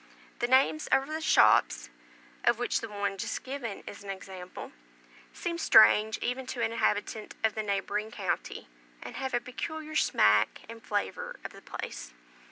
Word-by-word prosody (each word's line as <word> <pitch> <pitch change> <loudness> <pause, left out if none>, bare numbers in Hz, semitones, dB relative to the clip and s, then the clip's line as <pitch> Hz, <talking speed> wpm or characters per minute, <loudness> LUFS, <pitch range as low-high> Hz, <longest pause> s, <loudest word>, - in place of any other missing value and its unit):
The 240 - +1
names 265 +4 +3
over 275 +3 +2
the 315 - -3
shops 85 - +4 0.5
(of 235 - +3
which 245 - 0
the 225 - -6
one 200 -1 -3
just - - -3
given 255 -6 -5
is 200 - -9
a 195 -1 -5
sample) 185 -1 -9 0.6
seem 340 -1 -4
strange 220 -6 +6
even 255 +1 -2
to 250 -2 -4
an 225 - 0
inhabitant 215 -1 -1
of 220 -1 +3
the 220 - -2
neighbouring 210 +1 -2
county, 220 - -4 0.4
and - - -8
have 265 -2 -2
a - - +2
peculiar 310 +6 -6
smack 105 - +3
and 230 0 -10
flavour 205 -2 -3
of - - -5
the - - -13
place. - - -7
220 Hz, 165 wpm, -29 LUFS, 200-260 Hz, 0.6 s, strange